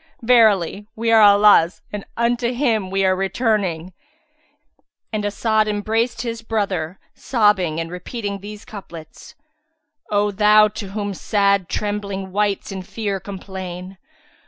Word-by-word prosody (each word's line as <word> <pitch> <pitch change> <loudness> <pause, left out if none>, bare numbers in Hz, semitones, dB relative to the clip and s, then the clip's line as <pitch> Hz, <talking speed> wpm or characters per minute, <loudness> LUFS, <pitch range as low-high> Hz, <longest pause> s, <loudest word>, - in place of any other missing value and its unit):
Verily, 210 -5 +3
we 230 +1 0
are 225 -1 +6
Allah's 205 -4 +5
and 205 -1 -4
unto 235 +1 +1
Him 235 -7 0
we 195 0 +1
are 185 0 +3
returning."[FN#364] 190 -3 -1 1.2
And 215 -1 -1
As'ad 215 +1 +1
em 205 -1 -1
braced 225 +4 -1
his 230 -1 -4
brother, 195 -6 -2 0.2
sobbing 205 - +1
and 165 0 -4
repeating 200 +3 -5
these 210 +1 -10
couplets, 170 -6 -11 0.7
"O 205 0 +1
Thou 210 +1 +5
to 210 -1 -7
whom 205 -1 -3
sad 200 -2 +1
trembling 200 -2 -3
wights 205 +1 -1
in 190 -1 -5
fear 200 +1 -4
complain! 190 -1 -8
205 Hz, 130 wpm, -20 LUFS, 190-215 Hz, 1.2 s, are